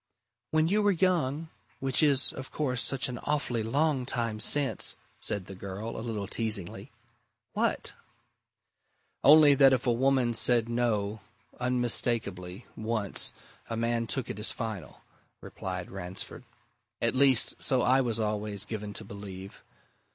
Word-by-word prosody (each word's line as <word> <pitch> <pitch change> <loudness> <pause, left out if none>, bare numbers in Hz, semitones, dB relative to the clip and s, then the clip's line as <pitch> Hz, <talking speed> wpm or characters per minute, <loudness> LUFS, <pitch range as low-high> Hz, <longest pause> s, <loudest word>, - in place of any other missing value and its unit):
"When 155 0 +2
you 205 +4 +2
were 205 - +3
young 165 -4 0 0.3
which 135 +1 +2
is, 140 -3 +4
of 130 -1 -8
course, 125 -5 -1
such 135 -2 +1
an 125 -1 -6
awfully 145 -6 -1
long 135 +3 0
time 115 -4 -1
since!" 140 +4 +3 0.2
said 100 -3 -1
the 95 - -9
girl, 100 +4 -7
a - - -5
little 110 -3 -4
teasingly. 105 -4 -2 0.6
"What?" - - -1 1.3
"Only 150 0 +8
that 135 -1 +6
if 130 0 0
a 120 - +3
woman 130 0 +2
said 115 0 +2
No 110 -3 -1 0.4
unmistakably 115 -7 -1
once, 110 -3 0 0.4
a 115 - -3
man 115 0 -1
took 130 0 -3
it 105 - -6
as 105 - +1
final," 110 -5 -6 0.4
replied 90 -1 -6
Ransford. 95 0 -6 0.5
"At - - 0
least 130 -2 +3
so 130 -3 +2
I 130 +2 +4
was 115 -3 -1
always 105 -1 -2
given 105 -1 -6
to 110 - -5
believe. 100 -1 -10
115 Hz, 140 wpm, -29 LUFS, 105-135 Hz, 1.3 s, Only